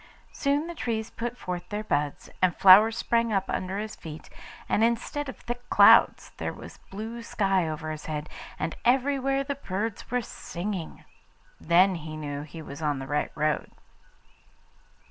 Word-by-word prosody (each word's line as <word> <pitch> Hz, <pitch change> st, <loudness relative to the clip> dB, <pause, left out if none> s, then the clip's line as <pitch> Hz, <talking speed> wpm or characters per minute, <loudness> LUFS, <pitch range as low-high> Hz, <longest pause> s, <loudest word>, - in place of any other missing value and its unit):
Soon 285 Hz, +2 st, 0 dB
the 345 Hz, -, -6 dB
trees 225 Hz, -7 st, -3 dB
put 240 Hz, +1 st, -4 dB
forth 180 Hz, -4 st, -5 dB
their 210 Hz, 0 st, -3 dB
buds, 145 Hz, -7 st, -1 dB
and 185 Hz, -2 st, +3 dB
flowers 210 Hz, +4 st, +7 dB
sprang 230 Hz, -1 st, +1 dB
up 195 Hz, -2 st, +1 dB
under 185 Hz, +1 st, -2 dB
his 215 Hz, +1 st, -4 dB
feet, 155 Hz, -1 st, -10 dB, 0.4 s
and 220 Hz, -, +2 dB
instead 235 Hz, +5 st, 0 dB
of -, -, -8 dB
thick 240 Hz, 0 st, -7 dB
clouds -, -, +6 dB
there -, -, -3 dB
was -, -, -11 dB
blue 220 Hz, +4 st, -6 dB
sky 195 Hz, -6 st, +1 dB
over 155 Hz, 0 st, -4 dB
his 155 Hz, -1 st, -7 dB
head, 150 Hz, -1 st, -4 dB, 0.3 s
and 160 Hz, +2 st, -3 dB
everywhere 270 Hz, +2 st, +2 dB
the 280 Hz, +1 st, -2 dB
birds 220 Hz, -4 st, -4 dB
were 250 Hz, 0 st, 0 dB
singing. 185 Hz, -3 st, -6 dB, 0.5 s
Then 185 Hz, +3 st, +4 dB
he 155 Hz, -2 st, -6 dB
knew 145 Hz, -2 st, -4 dB
that 150 Hz, -, -8 dB
he 160 Hz, 0 st, -8 dB
was 140 Hz, +1 st, -9 dB
in 150 Hz, -2 st, 0 dB
the 135 Hz, -, -5 dB
right 145 Hz, +2 st, -1 dB
road. 150 Hz, 0 st, 0 dB
195 Hz, 165 wpm, -27 LUFS, 155-235 Hz, 0.5 s, flowers